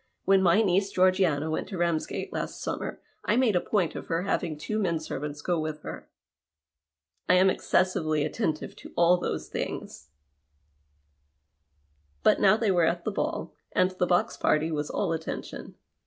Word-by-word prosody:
When 195 0 +5
my 190 +4 +4
niece 195 0 +2
Georgiana 185 -5 +2
went 155 - -2
to 195 - -6
Ramsgate 170 -2 -1
last - - -4
simimer, - - -3 0.3
I 210 - +1
made 240 -5 +3
a 175 - +3
point 190 -6 0
of - - -7
her 165 +1 -1
having 170 -5 -1
two 215 +8 -3
men 170 -6 0
servants 150 -1 -5
go 175 -2 0
with 155 -1 -4
her. - - -8 1.2
I 180 - +6
am 185 +1 +5
excessively 155 -7 +1
attentive 155 -2 -2
to - - -12
all 175 +1 +5
those - - -3
things." 70 - -5 2.1
But - - +5
now 200 +2 +6
they 225 -3 +1
were 175 -3 +3
at 170 +1 0
the 215 - 0
ball, 200 - -3 0.2
and 185 - +3
the 185 -1 -1
box 175 0 +1
party 155 +2 +1
was 150 -1 -2
all - - -1
attention. 160 0 -6
175 Hz, 165 wpm, -27 LUFS, 155-190 Hz, 2.1 s, I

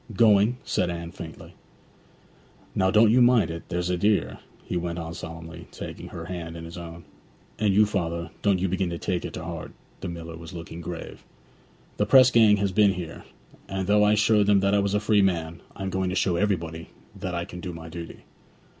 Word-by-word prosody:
'Going?' 110 +2 +4
said 90 - 0
Anne 85 -1 -5
faintly. 80 -3 -10 1.2
'Now, 95 - +2
don't 110 +2 +5
you 125 +2 +5
mind 120 -8 +5
it, 85 0 -8
there's 90 0 -1
a 90 - 0
dear,' 105 +3 +1 0.2
he - - -5
went 85 -1 -2
on 80 -1 -5
solemnly, 85 +1 -8
taking - - -8
her 80 -1 -7
hand 85 -2 -6
in 80 - -8
his 85 - -9
own. 85 -1 -9 0.6
'And 105 -2 +3
you, 105 +2 +5
father, 85 -5 -2
don't 100 -2 +3
you 95 +1 0
begin 95 0 -1
to 85 - -4
take 90 +1 -2
it - - -6
to - - -6
heart' - - -6 0.3
(the - - -5
miller 85 -1 -7
was 80 +2 -10
looking 85 0 -8
grave). 85 0 -7 0.7
'The - - +2
press 130 -1 +7
gang 110 -3 +6
has 100 -1 0
been 100 0 +4
here, 85 -3 -7 0.4
and 95 -1 -2
though 105 +2 +4
I 105 +1 +4
showed 105 -1 +3
them 100 -2 +5
that 100 +1 +2
I 100 - +4
was 100 0 0
a - - +3
free 105 0 +3
man, 85 -3 0
I 95 - -6
am 95 - -2
going 95 0 0
to 90 - -2
show 90 -1 +1
everybody 85 -4 -1 0.3
that 90 -1 -4
I 85 0 -2
can 90 - -9
do 90 0 -5
my 80 -1 -9
duty.' 85 0 -9
90 Hz, 215 wpm, -26 LUFS, 85-100 Hz, 1.2 s, press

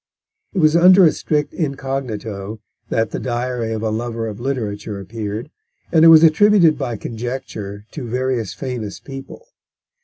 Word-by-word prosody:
It - - -6
was 155 -2 +4
under 180 +2 +7
a 155 - +5
strict 150 -1 -2
incognito 120 - -4 0.3
that 115 -1 0
The - - -3
Diary 120 -2 -2
of 110 0 -3
a 110 - 0
Lover 115 +1 -3
of 105 -2 -6
Literature 110 -5 -3
appeared, 105 - -6 0.4
and 160 -2 +5
it - - +9
was 165 0 +9
attributed 170 0 +5
by 125 -5 -4
conjecture 110 -4 -6
to 135 -6 -6
various 125 -3 -1
famous 120 -7 -5
people. 135 - -10
125 Hz, 150 wpm, -19 LUFS, 110-150 Hz, 0.4 s, it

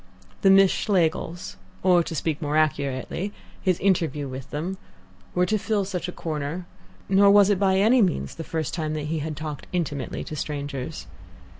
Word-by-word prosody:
The 195 - +5
Miss 195 0 +7
Schlegels 175 - 0 0.3
or, 180 -2 +5
to 165 - -4
speak 155 +1 -1
more 150 0 0
accurately, 145 +5 0 0.3
his 185 -3 +1
interview 165 -7 +1
with 130 0 -7
them 175 +6 -4 0.6
were 180 0 +3
to 215 +4 +1
fill 205 -1 0
such 180 -3 -3
a - - -4
corner, 160 +1 -4 0.4
nor 200 +1 +5
was 205 0 +6
it 195 - +1
by 190 -1 +3
any 230 +6 +5
means 70 - 0
the 165 - -6
first 160 -3 -3
time 155 -2 -2
that 150 - -3
he 160 - -1
had 155 0 -4
talked 155 -3 -6
intimately 150 -6 -2
to 155 - -6
strangers. 145 -3 -4
165 Hz, 175 wpm, -25 LUFS, 150-190 Hz, 0.6 s, Miss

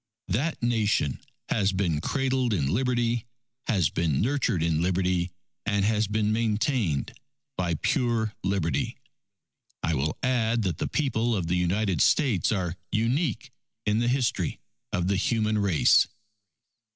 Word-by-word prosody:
That 130 - -1
Nation 110 - +1 0.3
has 100 -2 +2
been 85 -6 0
cradled 130 -1 0
in 70 -5 0
Liberty, 120 -1 0 0.4
has 95 - +2
been 80 -4 0
nurtured 120 - +1
in 80 -1 +1
Liberty, 90 0 +1 0.3
and 100 -2 +1
has 110 0 +2
been 105 +1 0
maintained 110 - 0 0.4
by 85 -2 0
pure 115 - 0
Liberty. 95 - -1 0.9
I 80 - +1
will 75 +1 -1
add 120 -3 +1
that 90 -5 -2
the - - -1
People 120 -5 0
of 95 -4 -1
the 85 +2 0
United 90 +2 +1
States 125 - +3
are 90 -4 -1 0.2
unique 120 - 0 0.3
in 105 +1 +2
the 120 - +1
history 125 0 0 0.3
of 90 - 0
the 100 0 +1
human 110 +1 +1
race. 100 -6 +4
105 Hz, 135 wpm, -27 LUFS, 90-120 Hz, 0.9 s, race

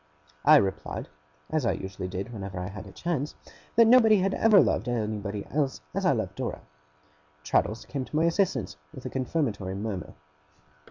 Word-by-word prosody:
I - - +9
replied, 95 -1 0 0.4
as 155 -2 +1
I 115 - +2
usually 95 -1 -5
did 95 +6 -5
whenever 100 -3 -5
I 90 0 -4
had 100 0 -8
a - - -11
chance, 155 - -3 0.4
that 230 - +7
nobody 225 -2 +7
had 195 +1 +1
ever 220 -3 +6
loved 115 - +2
anybody 105 -3 -2
else 140 -2 0
as - - 0
I - - +5
loved - - -1
Dora. - - -4 0.8
Traddles 110 +8 0
came 140 -2 -4
to - - -8
my 155 - +3
assistance 140 - 0 0.2
with 130 - -10
a 130 - -4
confirmatory 120 - -2
murmur. 100 -2 -4
120 Hz, 170 wpm, -27 LUFS, 100-160 Hz, 0.8 s, I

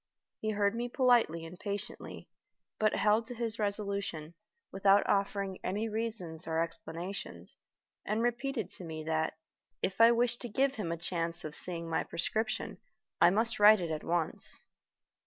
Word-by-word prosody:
He 215 - -2
heard 205 -1 +2
me 240 +1 -3
politely 240 - +3
and 175 +2 -10
patiently, 205 0 -5 0.5
but 215 -1 +3
held 215 +2 +3
to 245 - -6
his 230 -1 -1
resolution, 200 -6 -2 0.4
without 195 +1 +4
offering 200 -1 0
any 210 +4 -1
reasons 215 -7 -3
or 160 0 0
explanations, 165 - -5 0.5
and 215 +3 -1
repeated 240 -2 -1
to - - -6
me 160 -2 -6
that, 160 0 -1 0.5
if 190 +4 0
I 230 +1 +9
wished 240 0 +2
to 240 - -3
give 270 +5 +2
him 205 -10 -3
a 170 - -2
chance 170 -1 -2
of 155 - -5
seeing 170 -2 +1
my 160 - 0
prescription, 220 +6 -2 0.4
I 175 - +8
must 225 +5 +1
write 210 0 +8
it 170 -2 -3
at 155 -1 -3
once. 170 -2 -1
200 Hz, 155 wpm, -32 LUFS, 170-225 Hz, 0.5 s, I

